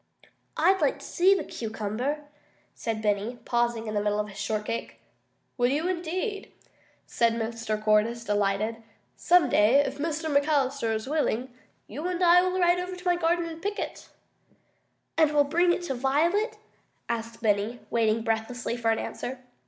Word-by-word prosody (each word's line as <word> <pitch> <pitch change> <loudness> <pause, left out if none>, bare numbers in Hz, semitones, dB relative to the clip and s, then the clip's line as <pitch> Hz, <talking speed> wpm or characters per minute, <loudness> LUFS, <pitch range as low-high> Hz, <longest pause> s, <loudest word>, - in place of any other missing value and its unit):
"I'd 380 0 +3
like - - +2
to - - -12
see 375 +3 +4
the 360 - -2
cucumber," 225 +6 -3 0.5
said 220 -2 -4
Benny, 210 +3 0
pausing 235 -1 0
in 215 - -4
the 205 - +1
middle 210 0 0
of 210 0 -2
his 195 - -12
shortcake. 215 +1 -3 0.6
"Would 245 +1 +3
you, 305 +5 0
indeed?" 370 +4 -3 0.5
said 230 -1 +1
Mr. 225 -1 -3
Cordyce, 215 +2 +2
delighted. 205 +1 0 0.4
"Some 355 -4 +4
day, 215 +1 +4
if 280 0 +2
Mrs. 315 -1 -2
McAllister 280 -5 +1
is 220 +3 -4
willing, 260 -4 -1 0.3
you 305 +5 -5
and 360 0 -1
I 350 +1 +7
will 370 +1 0
ride 350 0 +4
over 365 +1 -4
to 360 0 -13
my 355 -1 +3
garden 345 0 +1
and 330 -1 -7
pick 410 +2 -2
it." - - -6 1.1
"And 310 -2 +5
we'll 290 - +6
bring 345 +5 +2
it 350 - -1
to 280 - -2
Violet?" 310 - +1 0.5
asked 230 0 -4
Benny, 210 +3 +1
waiting 225 -1 +2
breathlessly 225 +2 -2
for 235 -2 0
an 225 - +2
answer. 260 +2 -5
250 Hz, 165 wpm, -27 LUFS, 225-335 Hz, 1.1 s, I